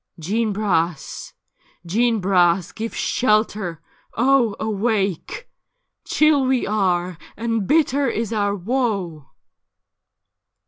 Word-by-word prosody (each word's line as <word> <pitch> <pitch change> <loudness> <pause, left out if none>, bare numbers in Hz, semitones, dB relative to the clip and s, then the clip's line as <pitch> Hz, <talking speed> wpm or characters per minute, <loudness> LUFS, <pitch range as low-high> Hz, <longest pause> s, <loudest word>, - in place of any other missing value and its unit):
' - - -54
Jeanne 215 +7 -1
Bras! 175 -7 -2 0.5
Jeanne 225 +5 +1
Bras! 180 -2 +2
give 225 +1 -6
shelter 215 -7 0 0.3
I 230 - 0
Oh, 255 -5 +3
awake! 215 - -2 0.6
Chill 305 -3 +3
we 260 -1 +1
are, 180 -4 0 0.2
and 225 -2 -1
bitter 285 -2 +2
is 230 -1 -2
our 205 -2 0
woe.' 195 - -2
215 Hz, 100 wpm, -21 LUFS, 185-235 Hz, 0.6 s, Oh